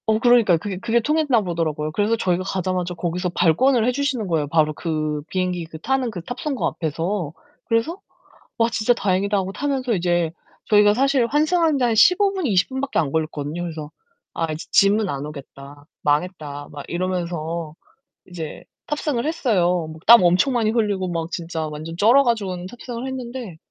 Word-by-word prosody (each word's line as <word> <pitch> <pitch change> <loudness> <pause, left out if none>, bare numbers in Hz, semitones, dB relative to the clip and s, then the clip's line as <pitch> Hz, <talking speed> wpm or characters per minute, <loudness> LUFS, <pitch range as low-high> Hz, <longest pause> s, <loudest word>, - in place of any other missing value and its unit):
어 220 0 +3
그러니까요. 235 -7 +5
그게 190 +3 -5
그게 235 +2 +1
통했나 290 -2 +2
보더라고요. 160 -4 -2
그래서 210 +7 +1
저희가 185 -4 0
가자마자 185 -2 -2
거기서 180 +2 -2
발권을 225 - +3
해 250 - +3
주시는 260 -5 -1
거예요 160 -4 0
바로 155 0 +2
그 155 -2 -2
비행기 180 -2 -2
그 160 0 -10
타는 260 +5 0
그 180 -5 -6
탑승구 275 - -3
앞에서. 165 +1 -2 0.3
그래서 235 +11 0 0.6
'와 230 -1 +3
진짜 230 +1 +2
다행이다.' 200 -1 0
하고 190 -1 -1
타면서 265 0 -1
이제 175 -3 +1 0.4
저희가 205 -1 +6
사실 265 0 +2
환승하는데 310 0 +2
한 235 -2 +2
15 390 - +5
분, 375 -4 -2
20 190 -5 +2
분밖에 265 +1 -3
안 145 -4 +1
걸렸거든요. 155 +1 -3
그래서 155 -3 -6 0.4
'아 165 -1 -2
이제 155 - -7
짐은 200 +1 +4
안 140 -2 -3
오겠다. 145 -1 -11 0.2
망했다.' 150 -1 -2
막 145 -1 -8
이러면서 170 -3 -3 0.5
이제 165 -4 -7 0.2
탑승을 295 -4 -1
했어요. 180 - +1
뭐 160 - -11
땀 235 -3 +9
엄청 180 +10 +3
많이 225 -3 +1
흘리고 205 -5 0
막 165 -1 -3
진짜 165 -2 -4
완전 155 +2 -7
쩔어 235 +8 +5
가지고는 195 -7 -1
탑승을 240 +3 -7
했는데 245 -7 -6
185 Hz, 375 characters per minute, -22 LUFS, 165-240 Hz, 0.6 s, 땀